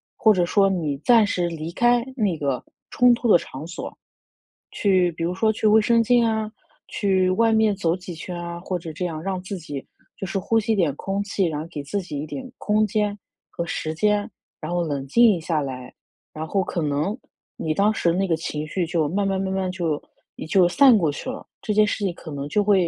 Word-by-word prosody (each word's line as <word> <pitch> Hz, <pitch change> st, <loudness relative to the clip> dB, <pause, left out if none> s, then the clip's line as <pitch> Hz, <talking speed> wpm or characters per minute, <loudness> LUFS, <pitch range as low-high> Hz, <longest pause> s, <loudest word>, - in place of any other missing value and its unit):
或 220 Hz, -, +5 dB
者 180 Hz, -3 st, +2 dB
说 195 Hz, +2 st, +3 dB
你 155 Hz, -7 st, -1 dB
暂 230 Hz, +2 st, +5 dB
时 175 Hz, -3 st, 0 dB
离 160 Hz, 0 st, -5 dB
开 240 Hz, +4 st, +3 dB
那 205 Hz, -9 st, +1 dB
个 135 Hz, -4 st, -2 dB, 0.3 s
冲 245 Hz, 0 st, +5 dB
突 240 Hz, 0 st, -1 dB
的 175 Hz, -, +8 dB
场 145 Hz, +2 st, -8 dB
所， 175 Hz, -, -7 dB, 0.8 s
去 185 Hz, -4 st, +2 dB
比 165 Hz, +1 st, -5 dB
如 180 Hz, +2 st, -2 dB
说 220 Hz, +3 st, +2 dB
去 220 Hz, 0 st, 0 dB
卫 215 Hz, +1 st, +6 dB
生 230 Hz, +1 st, +3 dB
间 240 Hz, +1 st, +3 dB
啊， 220 Hz, -1 st, 0 dB, 0.4 s
去 190 Hz, -3 st, +1 dB
外 225 Hz, +4 st, +3 dB
面 220 Hz, -2 st, +3 dB
走 170 Hz, -4 st, 0 dB
几 180 Hz, -1 st, -8 dB
圈 175 Hz, +2 st, -6 dB
啊， 170 Hz, 0 st, -6 dB
或 185 Hz, -1 st, -3 dB
者 165 Hz, -2 st, -8 dB
这 180 Hz, +4 st, -3 dB
样 155 Hz, -2 st, -5 dB
让 190 Hz, 0 st, -3 dB
自 190 Hz, +1 st, -5 dB
己 145 Hz, -5 st, -7 dB, 0.3 s
就 -, -, -5 dB
是 195 Hz, +1 st, -2 dB
呼 225 Hz, +4 st, +1 dB
吸 220 Hz, +1 st, 0 dB
点 165 Hz, -8 st, +1 dB
空 195 Hz, +4 st, -3 dB
气， 195 Hz, -1 st, -1 dB
然 150 Hz, -2 st, -3 dB
后 160 Hz, -, -7 dB
给 150 Hz, -4 st, -6 dB
自 200 Hz, +8 st, -2 dB
己 170 Hz, -5 st, -6 dB
一 150 Hz, -, -4 dB
点 260 Hz, -, -7 dB
空 215 Hz, 0 st, +1 dB
间 210 Hz, 0 st, -1 dB, 0.3 s
和 170 Hz, -, -4 dB
时 155 Hz, -1 st, -3 dB
间。 205 Hz, +4 st, +1 dB, 0.3 s
然 155 Hz, -, -5 dB
后 175 Hz, -1 st, +1 dB
冷 140 Hz, -4 st, -3 dB
静 220 Hz, -, +5 dB
下 160 Hz, -1 st, -1 dB
来， 130 Hz, -2 st, -6 dB, 0.4 s
然 155 Hz, +1 st, -5 dB
后 195 Hz, +4 st, 0 dB
可 175 Hz, -2 st, -3 dB
能 150 Hz, -, -1 dB, 0.4 s
你 155 Hz, -1 st, -2 dB
当 205 Hz, +5 st, +2 dB
时 170 Hz, -5 st, +1 dB
那 190 Hz, +3 st, 0 dB
个 165 Hz, -, +2 dB
情 155 Hz, -1 st, -4 dB
绪 175 Hz, +2 st, -1 dB
就 160 Hz, -3 st, 0 dB
慢 200 Hz, +5 st, 0 dB
慢 195 Hz, -1 st, 0 dB
慢 190 Hz, 0 st, -2 dB
慢 190 Hz, -1 st, -1 dB
就 165 Hz, -5 st, -1 dB, 0.5 s
就 185 Hz, -3 st, +5 dB
是 175 Hz, -, -5 dB
散 270 Hz, -5 st, +7 dB
过 165 Hz, -6 st, +1 dB
去 145 Hz, -, -5 dB
了， 255 Hz, -, -7 dB
这 210 Hz, -, -1 dB
件 210 Hz, 0 st, +4 dB
事 205 Hz, -, -2 dB
情 190 Hz, -3 st, 0 dB
可 170 Hz, -, -11 dB
能 140 Hz, -2 st, -5 dB
就 210 Hz, -, +2 dB
会 195 Hz, -4 st, +3 dB
185 Hz, 245 characters per minute, -23 LUFS, 160-210 Hz, 0.8 s, 的